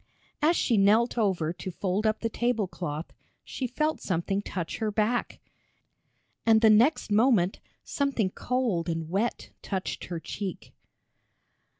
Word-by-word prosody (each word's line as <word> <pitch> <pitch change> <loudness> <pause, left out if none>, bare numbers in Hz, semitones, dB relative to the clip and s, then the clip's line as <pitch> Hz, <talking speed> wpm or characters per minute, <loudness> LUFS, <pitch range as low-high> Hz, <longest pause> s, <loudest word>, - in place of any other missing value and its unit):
As 320 +4 +4
she 235 -8 +2
knelt 215 +5 +4
over 185 -8 0
to 185 - -7
fold 190 +4 -1
up 215 - 0
the 230 - 0
table 240 -2 0
cloth, 160 -3 -5 0.3
she 260 - -4
felt 305 +5 -1
something 195 +2 -1
touch 175 -5 -5
her 220 - 0
back, 215 +3 -1 1.0
and 220 -1 +5
the 220 -2 +7
next 230 +3 +3
moment 210 -4 +3 0.2
something 270 -9 -1
cold 225 -11 -1
and 165 -1 -3
wet 210 +6 -1
touched 190 -2 -4
her 170 -2 -5
cheek. 190 +2 -6
210 Hz, 135 wpm, -27 LUFS, 185-240 Hz, 1.0 s, the